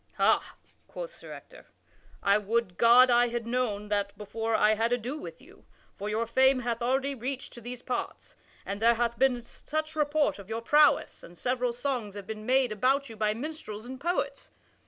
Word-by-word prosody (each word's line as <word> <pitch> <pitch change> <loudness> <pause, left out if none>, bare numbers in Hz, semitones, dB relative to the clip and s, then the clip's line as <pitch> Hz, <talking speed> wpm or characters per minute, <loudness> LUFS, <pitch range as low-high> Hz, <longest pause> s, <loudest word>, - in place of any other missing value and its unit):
"Ha," - - +2 0.3
quoth - - -7
Sir - - -12
Ector, - - -12 0.6
"I 200 +1 +4
would 210 -2 -1
God 245 +2 +7
I 240 0 +5
had 235 -1 -3
known 230 -4 -2
that 200 -1 -1
before 225 +2 -2
I 215 0 +4
had 225 +2 0
ado 245 +3 -1
with 305 - -8
you, - - -18 0.3
for 205 - -5
your 220 +2 0
fame 260 +3 +3
hath 235 -1 -2
already 265 +3 0
reached 260 +1 -5
to 240 - -11
these 245 +1 -7
parts, 250 - -5 0.3
and 200 +2 -5
there 235 +1 +5
hath 235 0 -1
been 255 -2 +2
such 310 +6 -5
report 295 -4 +1
of 200 0 -12
your 225 +1 -3
prowess 295 +4 +3
and 175 +1 -13
several 250 +2 0
songs 240 -4 -3
have 200 -2 -7
been 215 +1 -7
made 260 -2 +3
about 265 +6 +1
you 225 - -9
by 215 0 0
minstrels 240 -5 -7
and 260 +1 -8
poets. 350 +2 -2
240 Hz, 190 wpm, -28 LUFS, 215-265 Hz, 0.6 s, God